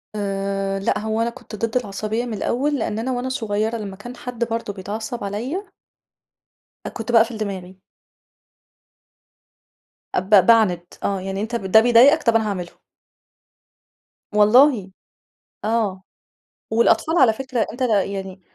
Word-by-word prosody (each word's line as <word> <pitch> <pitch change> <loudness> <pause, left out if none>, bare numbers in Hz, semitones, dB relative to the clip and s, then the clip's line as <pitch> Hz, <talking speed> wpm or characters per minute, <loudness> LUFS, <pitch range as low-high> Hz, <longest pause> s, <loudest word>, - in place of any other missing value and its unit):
آآ 195 -1 -2
لأ، 195 - 0
هو 220 +1 -2
أنا 235 - +1
كنت 235 - -11
ضد 230 +3 -1
العصبية 215 +1 -3
من 240 - -5
الأول 275 +7 -1
لأن 220 -1 -2
أنا 250 +3 -2
وأنا 250 +1 -2
صغيرة 220 -2 -1
لما 200 -3 -6
كان 240 +5 -10
حد 245 -1 -4
برضه 230 -3 -3
بيتعصب 215 +5 -5
عليا 250 - -4 1.2
أ - - -3
كنت 225 +1 -5
باقفل 230 0 +3
دماغي. 190 -3 -5 2.4
أب 185 +2 -1 0.2
باعند، 215 -7 +4 0.2
آه، 195 -1 -1
يعني 195 +1 -4
أنت 230 +2 -3
ب 215 - -3
ده 220 - +9
بيضايقك، 245 +7 +5
طب 230 -1 +2
أنا 220 -1 +2
هاعمله. 180 -3 -4 1.6
والله 210 -1 +5 0.7
آه، 210 -4 -1 0.7
والأطفال 235 +9 +2
على 250 -4 +6
فكرة 255 0 -2
أنت 250 - -11
يعني 195 -4 -1
220 Hz, 135 wpm, -21 LUFS, 200-240 Hz, 2.4 s, ده